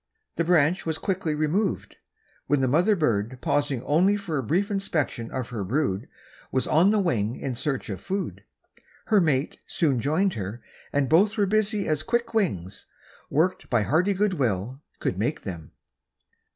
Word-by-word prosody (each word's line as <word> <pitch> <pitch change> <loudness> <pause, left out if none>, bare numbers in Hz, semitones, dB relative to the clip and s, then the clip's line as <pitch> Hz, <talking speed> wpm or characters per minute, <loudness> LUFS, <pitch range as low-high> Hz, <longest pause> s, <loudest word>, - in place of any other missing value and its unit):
The 170 - +1
branch 170 +1 +3
was 160 -1 -2
quickly 185 -5 -1
removed, 170 +7 -1 0.5
when 145 0 +2
the 130 - +2
mother 175 - +3
bird, 120 - 0
pausing 135 -4 0
only 185 +7 +3
for 170 -8 -3
a - - -2
brief 185 - 0
inspection 160 - -2
of 130 -2 -4
her 115 -5 -4
brood, 115 -1 -1 0.4
was 130 - +1
on 165 +6 +4
the 215 - +3
wing 120 - 0
in 130 - -4
search 135 +2 -2
of 95 -4 -5
food. 195 0 -4 0.6
Her 210 -3 +4
mate 145 -4 0
soon 140 -7 +1
joined 170 - +1
her, 105 +3 -5 0.3
and 140 -1 +1
both 200 - +4
were 205 - +3
busy 210 0 +1
as 155 -1 +1
quick 235 +6 -1
wings, 100 - -1 0.4
worked 165 +6 0
by 120 -4 +2
hearty 180 - +2
good 195 -4 0
will, 120 +2 -1 0.2
could - - -2
make - - -1
them. 85 -4 -7
155 Hz, 165 wpm, -26 LUFS, 125-190 Hz, 0.6 s, on